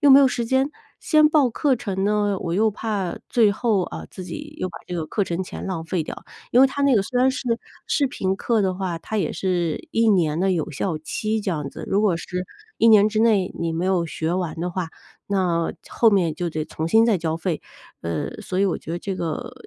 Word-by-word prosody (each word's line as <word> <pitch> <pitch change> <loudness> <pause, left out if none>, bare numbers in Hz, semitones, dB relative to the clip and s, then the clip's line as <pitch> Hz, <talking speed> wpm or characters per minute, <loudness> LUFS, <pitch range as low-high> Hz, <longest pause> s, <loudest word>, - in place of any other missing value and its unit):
又 290 -2 +6
没 270 - +10
有 270 - +6
时 240 - -2
间。 265 +4 +1 0.3
先 305 -2 +4
报 295 -5 +3
课 265 +2 +1
程 195 -3 -2
呢， 205 -2 +1
我 170 -1 -2
又 215 +2 +3
怕 205 -4 -2
最 220 -4 +4
后， 210 -3 +1
啊， - - -6
自 185 - -8
己 300 - -7
又 - - -1
把 165 - -9
这 180 - -5
个 160 -3 -2
课 205 - -1
程 175 0 -2
钱 - - -7
浪 170 -4 -3
费 165 0 -1
掉。 - - -8 0.3
因 245 - +6
为 270 - +8
它 270 +1 -5
那 275 -4 +5
个 200 - +3
虽 250 +4 -1
然 260 - +5
是 265 - -4 0.4
视 285 -3 +2
频 190 -6 -1
课 220 +1 +1
的 190 - +1
话， 185 -3 -3
它 215 +5 -3
也 170 - 0
是 175 -4 -1
1 225 0 +3
年 170 -5 +2
的 195 - +2
有 170 -2 -1
效 160 +3 -2
期 215 +7 -2
这 200 - -2
样 150 -5 -2
子。 - - -8
如 200 - +2
果 205 -5 +2
是 180 +2 -4 0.3
1 230 - +5
年 210 -1 +7
之 215 0 +1
内 210 -5 +3
你 165 -1 -1
没 170 +2 -1
有 180 -3 +1
学 160 +1 -2
完 175 -3 -1
的 175 +2 -2
话， 175 -2 -3 0.4
那 180 -4 +1 0.2
后 230 - +4
面 180 -7 +2
就 175 +1 -2
得 155 -1 -3
重新 165 +10 +2
再 220 -6 +3
交 160 0 -1
费。 165 -1 -2 0.4
呃， 85 -1 -3
所 185 - -3
以 195 - +4
我 190 - 0
觉 160 - -9
得 170 - -2
这 195 +1 -4
个， 165 -4 -4
190 Hz, 255 characters per minute, -23 LUFS, 170-225 Hz, 0.4 s, 没